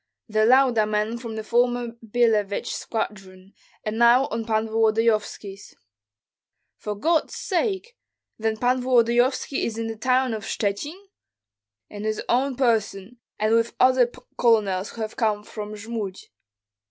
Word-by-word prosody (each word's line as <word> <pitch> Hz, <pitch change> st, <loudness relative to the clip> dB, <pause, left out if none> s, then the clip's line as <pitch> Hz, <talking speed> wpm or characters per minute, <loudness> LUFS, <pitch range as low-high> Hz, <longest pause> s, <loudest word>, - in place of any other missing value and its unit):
"The 215 Hz, -1 st, +2 dB
Lauda 250 Hz, -4 st, +4 dB
men 215 Hz, +2 st, -1 dB
from 230 Hz, -2 st, -7 dB
the 220 Hz, -, -4 dB
former 240 Hz, +1 st, +1 dB
Billevich 220 Hz, -3 st, +1 dB
squadron, 195 Hz, -3 st, -5 dB, 0.3 s
and 215 Hz, +1 st, -3 dB
now 240 Hz, +3 st, +6 dB
of 225 Hz, -4 st, -4 dB
Pan 220 Hz, 0 st, +1 dB
Volodyovski's." 220 Hz, -2 st, 0 dB, 1.0 s
"For 210 Hz, -, -5 dB
God's 320 Hz, +10 st, 0 dB
sake! 405 Hz, +4 st, -2 dB, 0.4 s
Then 220 Hz, 0 st, -1 dB
Pan 250 Hz, +2 st, +1 dB
Volodyovski 245 Hz, +2 st, +2 dB
is 225 Hz, -1 st, -3 dB
in 230 Hz, -, -2 dB
the 225 Hz, 0 st, -4 dB
town 255 Hz, +2 st, +1 dB
of 215 Hz, -2 st, -5 dB
Shchuchyn?" 220 Hz, -, -3 dB, 0.9 s
"In 205 Hz, 0 st, -7 dB
his 215 Hz, 0 st, -1 dB
own 260 Hz, +2 st, +1 dB
person, 225 Hz, -3 st, -1 dB, 0.2 s
and 215 Hz, +1 st, +1 dB
with 230 Hz, 0 st, +1 dB
other 255 Hz, -2 st, +4 dB, 0.3 s
colonels 210 Hz, -5 st, +2 dB
who 230 Hz, -, -8 dB
have 215 Hz, 0 st, -5 dB
come 215 Hz, -3 st, 0 dB
from 210 Hz, 0 st, -7 dB
Jmud." 210 Hz, -3 st, -5 dB
225 Hz, 135 wpm, -24 LUFS, 215-245 Hz, 1.0 s, now